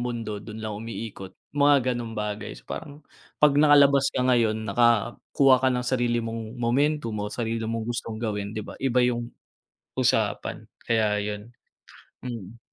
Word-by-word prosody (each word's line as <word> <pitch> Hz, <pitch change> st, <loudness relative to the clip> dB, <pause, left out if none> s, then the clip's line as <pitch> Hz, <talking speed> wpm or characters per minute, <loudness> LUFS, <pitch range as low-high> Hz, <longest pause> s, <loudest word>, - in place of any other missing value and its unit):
mundo, 115 Hz, -4 st, -4 dB
dun 110 Hz, -1 st, -9 dB
lang 110 Hz, -, -3 dB
umiikot. 110 Hz, -3 st, -7 dB, 0.2 s
Mga 145 Hz, 0 st, +5 dB, 0.2 s
ganong 115 Hz, -2 st, -5 dB
bagay, 105 Hz, -1 st, -4 dB
so, -, -, -15 dB
parang 145 Hz, -2 st, -8 dB, 0.3 s
pag 150 Hz, -1 st, +5 dB
nakalabas 140 Hz, -2 st, +6 dB
ka 125 Hz, -, -1 dB
ngayon 115 Hz, -4 st, +3 dB
nakakuha 120 Hz, +3 st, +3 dB
ka 130 Hz, -, +3 dB
ng 125 Hz, -1 st, -1 dB
sarili 120 Hz, -2 st, +1 dB
mong 115 Hz, +1 st, -5 dB
momentum 125 Hz, +1 st, +1 dB
mo, 105 Hz, -1 st, -3 dB
sarili 115 Hz, 0 st, -3 dB
mong 115 Hz, -1 st, -2 dB
gustong 115 Hz, -1 st, -4 dB
gawin 105 Hz, -2 st, -3 dB
'di 110 Hz, -, -3 dB
ba. -, -, -9 dB
Iba 125 Hz, -2 st, +2 dB
yung 120 Hz, -1 st, -1 dB, 0.7 s
usapan -, -, 0 dB, 0.2 s
kaya 105 Hz, -3 st, +1 dB
ayun, 105 Hz, +3 st, -6 dB, 0.7 s
mm. 115 Hz, -2 st, -7 dB
115 Hz, 150 wpm, -26 LUFS, 110-125 Hz, 0.7 s, nakalabas